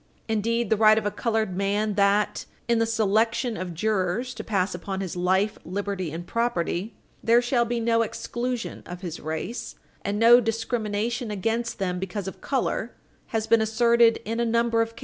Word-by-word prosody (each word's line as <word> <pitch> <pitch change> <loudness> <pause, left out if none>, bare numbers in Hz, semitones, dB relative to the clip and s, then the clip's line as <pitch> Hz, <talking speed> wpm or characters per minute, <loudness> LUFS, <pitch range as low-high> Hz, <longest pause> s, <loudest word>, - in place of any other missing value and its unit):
Indeed, 230 +1 0
the 220 - +4
right 215 0 +6
of 220 - 0
a 205 - +1
colored 220 -5 -1
man 205 +2 0
that, 200 +1 +2 0.2
in 235 -1 +3
the 230 - +2
selection 225 +2 +1
of 180 -3 -5
jurors 215 +5 0
to - - -7
pass 190 -3 0
upon 190 +2 -4
his 190 -3 -4
life, 190 +4 +1
liberty 195 -3 -3
and 170 +2 -6
property, 220 -2 -1 0.3
there 235 +1 +5
shall 240 0 +1
be 235 +1 -1
no 230 0 +2
exclusion 240 +2 -3
of 180 0 -8
his 175 -3 -5
race 160 +10 -5 0.3
and 200 +1 -1
no 235 +2 +8
discrimination 225 0 -2
against 225 +4 -2
them 180 -2 -2
because 190 +1 -4
of 190 - -7
color 250 -3 -1 0.3
has 220 -1 -1
been 225 0 +4
asserted 230 +1 +4
in 230 +2 -2
a - - +2
number 230 0 +2
of 230 0 -2
cases. - - -12
220 Hz, 180 wpm, -25 LUFS, 195-230 Hz, 0.3 s, no